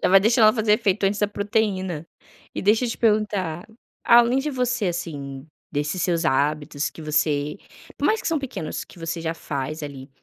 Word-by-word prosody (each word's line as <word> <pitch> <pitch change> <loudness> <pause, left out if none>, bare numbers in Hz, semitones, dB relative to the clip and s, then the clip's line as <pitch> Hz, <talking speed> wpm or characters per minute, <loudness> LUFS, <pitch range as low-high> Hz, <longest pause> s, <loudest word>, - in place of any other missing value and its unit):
Já - - +3
vai 195 +1 +7
deixando 225 +2 +4
ela 215 - +7
fazer 220 -2 +2
efeito 200 -1 +1
antes 200 +1 +1
da 205 - +2
proteína. 200 -6 -1 0.5
E - - -3
deixa 220 +5 +3
eu - - -1
te - - -4
perguntar. 210 -7 0 0.4
Além 240 +2 +6
de 300 +3 -1
você, 245 -4 0
assim, 145 -6 -4 0.3
desses 150 +5 -1
seus 170 -1 +1
hábitos 145 +1 0
que 160 - -11
você 150 +1 0 0.4
por - - +1
mais 440 0 +2
que - - -2
são 325 -2 +1
pequenos, 245 - -5
que 175 - -16
você 165 0 -3
já 165 0 -2
faz 150 0 -4
ali, 140 -1 -7
185 Hz, 195 wpm, -23 LUFS, 155-215 Hz, 0.5 s, vai